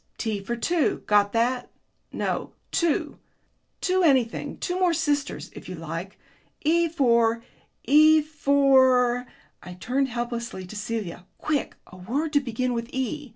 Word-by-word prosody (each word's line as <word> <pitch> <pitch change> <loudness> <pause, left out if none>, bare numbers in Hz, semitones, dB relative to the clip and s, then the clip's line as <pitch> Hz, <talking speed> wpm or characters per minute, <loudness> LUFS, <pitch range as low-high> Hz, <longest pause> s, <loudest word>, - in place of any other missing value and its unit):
T 220 -3 -2
for 195 +5 -4
two. 325 +6 0
Got 205 -1 +3
that? 245 +2 0 0.4
No, - - -3 0.2
two. 335 -4 0 0.6
Two 375 0 +1
anything 265 -8 +1
two 360 0 -3
more 360 -2 +3
sisters, 290 -3 -1
if - - -10
you 185 - -5
like. 165 +4 -6 0.4
E 335 +2 +2
for 235 -6 +2 0.4
E 310 +2 +6
for 265 -4 +3 0.2
" - - -36
I 180 - -9
turned 255 +9 -1
helplessly 235 -5 -4
to 180 - -10
Celia: 205 -5 -5
"quick, 305 -2 -2
a 185 - -14
word 280 - -3
to 285 - +5
begin 255 -1 -2
with 230 0 -4
E! 265 +2 -3
250 Hz, 145 wpm, -25 LUFS, 225-295 Hz, 0.6 s, E